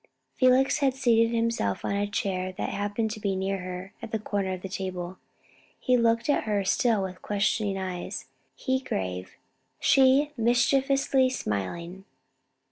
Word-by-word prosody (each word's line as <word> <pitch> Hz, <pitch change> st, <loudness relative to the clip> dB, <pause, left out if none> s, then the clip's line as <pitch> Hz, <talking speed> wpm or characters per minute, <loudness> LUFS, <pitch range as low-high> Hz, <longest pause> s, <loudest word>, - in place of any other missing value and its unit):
Felix 255 Hz, +3 st, +3 dB
had 270 Hz, -3 st, +2 dB
seated 230 Hz, -3 st, +3 dB
himself 230 Hz, -, 0 dB
on -, -, -1 dB
a 200 Hz, +1 st, 0 dB
chair 185 Hz, -2 st, -2 dB
that 190 Hz, -, -3 dB
happened 205 Hz, +2 st, -2 dB
to 215 Hz, -, -6 dB
be 200 Hz, -2 st, -1 dB
near 190 Hz, +1 st, -1 dB
her, 185 Hz, +1 st, -7 dB
at 230 Hz, -2 st, -7 dB
the 220 Hz, -, 0 dB
corner 200 Hz, -3 st, -2 dB
of 185 Hz, -, -7 dB
the -, -, -3 dB
table. 185 Hz, -1 st, -5 dB, 0.6 s
He 255 Hz, -, +2 dB
looked 230 Hz, -1 st, +2 dB
at 290 Hz, -, +2 dB
her 205 Hz, -2 st, 0 dB
still 220 Hz, 0 st, +2 dB
with 185 Hz, -1 st, -6 dB
questioning 205 Hz, 0 st, 0 dB
eyes 185 Hz, -2 st, -5 dB, 0.3 s
he 260 Hz, -1 st, 0 dB
grave, 90 Hz, -, -4 dB, 0.5 s
she 270 Hz, +2 st, +4 dB
mischievously 265 Hz, +3 st, +3 dB
smiling. 170 Hz, -, -4 dB
205 Hz, 150 wpm, -27 LUFS, 190-245 Hz, 0.6 s, she